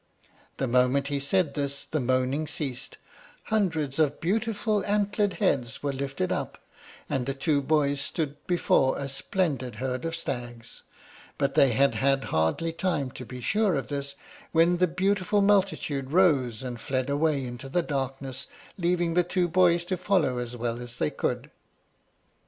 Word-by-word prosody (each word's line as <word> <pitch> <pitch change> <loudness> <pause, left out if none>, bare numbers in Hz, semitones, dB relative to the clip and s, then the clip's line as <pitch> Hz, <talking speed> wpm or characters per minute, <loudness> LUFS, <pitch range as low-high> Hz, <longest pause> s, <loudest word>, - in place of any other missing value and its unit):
The 135 - -1
moment 125 +3 +2
he 145 -1 0
said 145 +2 +1
this 140 -1 -2
the 155 - -2
moaning 130 +4 0
ceased, 140 -4 -4 0.5
hundreds 160 - 0
of 150 -2 +2
beautiful 215 +2 0
antlered 205 -1 +1
heads 135 - 0
were 140 -1 0
lifted 135 -7 -2
up, - - -3 0.5
and 130 -1 -1
the 135 - -1
two 145 +1 +1
boys 145 -1 +1
stood 145 0 -2
before 170 -6 +2
a 140 - -3
splendid 135 - -2
herd 130 +1 -3
of 165 0 -2
stags; 120 -7 -6 0.6
but - - 0
they 135 -3 +5
had 140 +4 +4
had 135 0 +2
hardly 80 - +1
time 165 -7 -1
to 125 - -8
be 125 -1 -8
sure 210 - +2
of 135 - -3
this 140 -1 -4 0.4
when 170 +2 +4
the 180 +1 +3
beautiful 195 +3 +1
multitude 190 -9 +1
rose 140 - +3
and 120 -2 -5
fled 130 -1 -1
away 145 -1 +1
into 120 +2 -7
the 175 +5 +1
darkness, 135 -2 -4 0.3
leaving 175 -1 +1
the 180 +1 +4
two 175 0 0
boys 175 0 +3
to 185 +1 -2
follow 180 -9 +1
as 120 0 -5
well 120 0 -2
as 120 0 -8
they 75 - 0
could. - - -2
140 Hz, 160 wpm, -27 LUFS, 130-175 Hz, 0.6 s, they